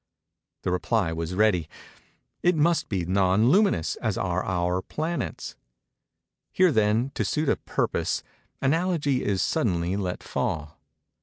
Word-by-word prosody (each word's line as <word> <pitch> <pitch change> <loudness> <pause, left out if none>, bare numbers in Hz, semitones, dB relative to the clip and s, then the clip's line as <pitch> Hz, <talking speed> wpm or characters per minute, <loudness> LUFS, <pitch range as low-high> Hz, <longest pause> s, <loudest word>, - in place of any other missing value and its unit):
The - - 0
reply 90 -1 0
was 85 +2 -4
ready—"It 105 - -2
must 165 +2 +2
be 95 -5 -1
non 95 +5 +3
luminous, 190 - +2
as 110 -5 -2
are 95 0 -1
our 90 0 0
planets." 155 - -4 1.0
Here, 185 -2 +4
then, 110 +2 +2
to - - -1
suit 150 -1 0
a - - +2
purpose, - - -1 0.4
analogy 150 -2 +1
is 100 -2 0
suddenly 90 - 0
let 95 -3 -3
fall. 75 -1 -3
105 Hz, 125 wpm, -26 LUFS, 90-145 Hz, 1.0 s, Here